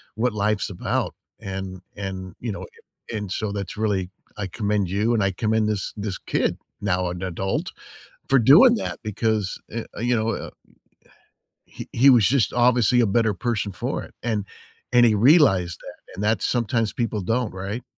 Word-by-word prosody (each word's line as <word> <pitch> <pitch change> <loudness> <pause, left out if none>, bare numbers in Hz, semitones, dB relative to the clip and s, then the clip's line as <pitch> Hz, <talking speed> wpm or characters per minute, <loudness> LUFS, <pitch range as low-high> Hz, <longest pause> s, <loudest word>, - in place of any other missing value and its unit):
what 115 +1 0
life's 105 0 0
about. 95 - -2 0.3
And 95 -1 -6
and, 95 -2 -6
you 115 - -3
know, - - -6 0.5
and 110 - -2
and 100 -3 -6
so 105 0 -2
that's 100 -3 -5
really 100 -4 0 0.3
I 105 - -3
commend 100 -1 -1
you 105 +5 +1
and 115 - +2
I 95 - +2
commend 110 +2 0
this 105 -3 -2
this 100 -2 -3
kid, - - -1 0.2
now 90 -2 0
an 90 0 -6
adult, 95 +1 -2 0.6
for 135 - +5
doing 160 - +7
that 220 - -4
because, 110 -2 -1 0.2
uh 115 - -1 0.2
uh - - -5
you 120 +1 +2
know 110 0 0
a - - -6
a - - -12 1.2
he - - -10
he 130 +4 +5
was 120 -6 +6
just 135 -4 +2
obviously 125 -1 +4
a - - +4
better 110 +1 +2
person 105 +1 -2
for 120 +8 -3
it. - - -13
And 110 -4 -1 0.5
and 120 -1 +6
he 110 -2 +4
realized 105 - +4
that, - - -13
and 100 - -4
that 110 +1 +1
sometimes 115 -2 0
people 115 -3 -2
don't, 115 +3 -1
right? 100 +5 -5
105 Hz, 185 wpm, -23 LUFS, 95-120 Hz, 1.2 s, doing